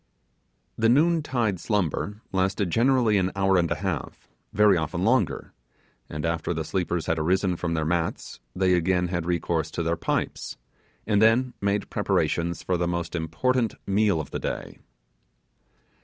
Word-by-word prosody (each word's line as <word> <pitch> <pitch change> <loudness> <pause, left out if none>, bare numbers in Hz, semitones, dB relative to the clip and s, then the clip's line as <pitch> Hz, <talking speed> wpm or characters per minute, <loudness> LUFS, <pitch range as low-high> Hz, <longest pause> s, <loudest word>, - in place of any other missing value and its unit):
The 115 0 +4
noon 160 +6 +4
tide 115 - -1
slumber 105 +1 -2
lasted 95 -1 0
generally 120 -3 +3
an 95 0 0
hour 95 0 +2
and 85 -2 +2
a - - 0
half: 90 -7 -4 0.2
very 105 -1 +5
often 85 +2 -2
longer; 125 +5 +1 0.6
and 75 0 -4
after 85 +1 -1
the 80 - -2
sleepers 90 0 -2
had 80 0 0
arisen 90 +3 +1
from 85 -1 -2
their 80 -1 -1
mats 85 0 -2 0.2
they 95 -1 +2
again 90 0 +1
had 85 -2 -2
recourse 85 -2 -1
to 85 - -3
their 85 +1 0
pipes, - - -3 0.5
and 105 -1 +2
then 120 +3 +4
made 100 0 -1
preparations 85 -1 0
for 90 - 0
the 85 0 0
most 85 0 -3
important 110 - 0
meal 100 -3 +2
of 75 - -6
the - - -3
day. - - -5
95 Hz, 155 wpm, -25 LUFS, 85-105 Hz, 0.6 s, very